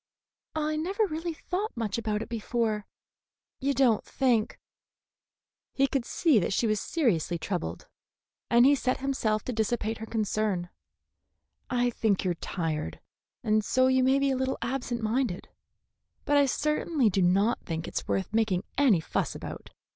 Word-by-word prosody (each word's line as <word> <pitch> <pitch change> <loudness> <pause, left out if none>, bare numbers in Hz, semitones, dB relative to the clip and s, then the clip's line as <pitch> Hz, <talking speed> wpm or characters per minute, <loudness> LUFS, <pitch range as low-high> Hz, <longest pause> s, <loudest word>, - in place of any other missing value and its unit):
I 310 0 0
never 385 +7 0
really 330 -1 -4
thought 370 - -4
much 225 -1 -1
about 215 -1 -1
it - - -10
before. 225 -2 -1 0.7
You 275 +1 0
don't 245 -6 +3
think 240 -5 0 0.6
" - - -65
He 275 - +4
could 270 -3 -1
see 300 -5 +3
that 195 - -1
she 235 - +1
was 215 -2 +1
seriously 195 - 0
troubled, 165 - -4 0.6
and 235 +1 +6
he 280 - +7
set 260 -2 0
himself 230 -6 0
to 250 - -3
dissipate 220 0 -1
her 220 - -6
concern. 210 -5 -1 1.0
"I 245 -1 +1
think 210 -4 0
you 180 - +2
are - - +1
tired, 160 - -3 0.4
and 215 0 +2
so 255 +5 +3
you 260 0 +3
may 265 +1 +4
be 275 0 +2
a - - +1
little 260 +1 -1
absent 240 -1 -3
minded; 225 -3 -1 0.8
but 290 - +2
I 285 -1 +5
certainly 300 -3 +1
do 190 - +1
not 195 +6 +3
think 165 -1 -4
it's - - -4
worth 195 +2 -1
making 215 -5 +1 0.2
any 235 - +5
fuss - - -2
about. - - -8
235 Hz, 160 wpm, -28 LUFS, 210-270 Hz, 1.0 s, he